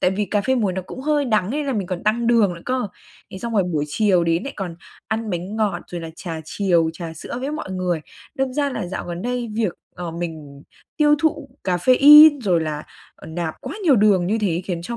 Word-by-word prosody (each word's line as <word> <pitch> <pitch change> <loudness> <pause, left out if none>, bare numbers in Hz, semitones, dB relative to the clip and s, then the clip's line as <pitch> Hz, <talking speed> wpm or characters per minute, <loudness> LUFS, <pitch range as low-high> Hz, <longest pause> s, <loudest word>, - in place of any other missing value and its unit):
tại 180 - +3
vì 205 +2 -1
cà 205 - 0
phê 260 +6 +1
muối 215 -7 +1
nó 185 0 -3
cũng 255 - -9
hơi 295 +1 +1
đắng 215 -5 +1
nên 290 +2 -2
là 270 - 0
mình 200 -4 -2
còn 180 -2 -4
tăng 230 +3 +1
đường 225 -6 +3
nữa 170 - -11
cơ. 255 -5 -1 0.4
Thế 190 - -6
xong 235 +1 -5
rồi 200 - +4
buổi 155 -5 -1
chiều 185 0 +2
đến 165 +1 +1
lại 275 - -5
còn 180 -4 -5 0.3
ăn 220 +1 -2
bánh 180 +5 -4
ngọt 205 -5 0
rồi 175 - -5
là 165 -1 -7
trà 165 -3 -6
chiều, 170 -2 +1
trà 165 -1 -7
sữa 200 +9 -6
với 275 +3 -3
mọi 305 -11 -5
người, 180 -3 -1 0.3
đâm 265 -1 -1
ra 285 0 0
là 220 - -4
dạo 185 - -5
gần 175 +1 -5
đây 245 -2 -3
việc, 215 -5 0 0.2
ờ, 175 -2 -5
mình 160 -4 -7 0.3
tiêu 295 -1 +5
thụ 295 -3 0 0.2
caffeine 280 - +7
rồi 180 -7 +2
là, 155 -1 -3 0.3
ờ, - - -13
nạp 160 0 -4
quá 265 +4 -6
nhiều 290 -7 +5
đường 200 -4 +4
như 220 +4 0
thế 180 -4 -1
khiến 175 -3 -4
cho 235 +7 -5
195 Hz, 240 wpm, -21 LUFS, 175-245 Hz, 0.4 s, caffeine